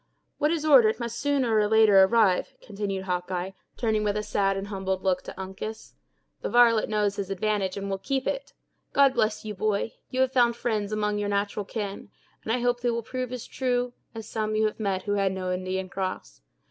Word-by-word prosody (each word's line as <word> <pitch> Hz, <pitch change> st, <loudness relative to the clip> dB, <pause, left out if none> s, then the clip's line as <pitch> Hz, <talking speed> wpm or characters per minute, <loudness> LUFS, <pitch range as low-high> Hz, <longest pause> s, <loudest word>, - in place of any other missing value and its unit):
"What 300 Hz, -, +3 dB
is 320 Hz, -2 st, -1 dB
ordered 250 Hz, -8 st, +6 dB
must 235 Hz, -1 st, -4 dB
sooner 275 Hz, -5 st, +1 dB
or 210 Hz, -1 st, +3 dB
later 215 Hz, -2 st, +6 dB
arrive," 195 Hz, -2 st, +3 dB
continued 200 Hz, -2 st, -4 dB
Hawkeye, 180 Hz, 0 st, -2 dB, 0.3 s
turning 220 Hz, -3 st, +1 dB
with 205 Hz, 0 st, 0 dB
a 210 Hz, -, -2 dB
sad 195 Hz, -2 st, 0 dB
and 195 Hz, +1 st, -5 dB
humbled 190 Hz, -2 st, -2 dB
look 185 Hz, -1 st, +1 dB
to -, -, -9 dB
Uncas. 190 Hz, +3 st, -7 dB, 0.5 s
"The -, -, -3 dB
varlet 235 Hz, -2 st, +5 dB
knows 210 Hz, -2 st, 0 dB
his 195 Hz, -1 st, -3 dB
advantage 195 Hz, -1 st, -1 dB
and 200 Hz, 0 st, -4 dB
will 195 Hz, -1 st, -2 dB
keep 265 Hz, +5 st, -2 dB
it! -, -, -3 dB, 0.4 s
God 275 Hz, -1 st, +5 dB
bless 215 Hz, -3 st, 0 dB
you, 210 Hz, -, -4 dB
boy; 210 Hz, +2 st, -1 dB, 0.2 s
you 255 Hz, -, 0 dB
have 260 Hz, 0 st, +2 dB
found 240 Hz, -2 st, +4 dB
friends 215 Hz, -4 st, -2 dB
among 210 Hz, -1 st, 0 dB
your 205 Hz, 0 st, -1 dB
natural 200 Hz, 0 st, -1 dB
kin, 205 Hz, -2 st, -5 dB, 0.3 s
and 220 Hz, -, -2 dB
I 245 Hz, +1 st, +1 dB
hope 245 Hz, 0 st, +1 dB
they 245 Hz, -, +1 dB
will 235 Hz, 0 st, -1 dB
prove 255 Hz, +1 st, -4 dB
as 250 Hz, -2 st, -5 dB
true 245 Hz, -1 st, -1 dB, 0.2 s
as 225 Hz, -1 st, -7 dB
some 215 Hz, -1 st, -2 dB
you 220 Hz, 0 st, +2 dB
have 215 Hz, -, -2 dB
met 195 Hz, -3 st, -1 dB
who 205 Hz, -, -3 dB
had 195 Hz, -2 st, +1 dB
no 185 Hz, -1 st, -2 dB
Indian 185 Hz, +1 st, -3 dB
cross. 185 Hz, -, -5 dB
210 Hz, 210 wpm, -26 LUFS, 195-235 Hz, 0.5 s, ordered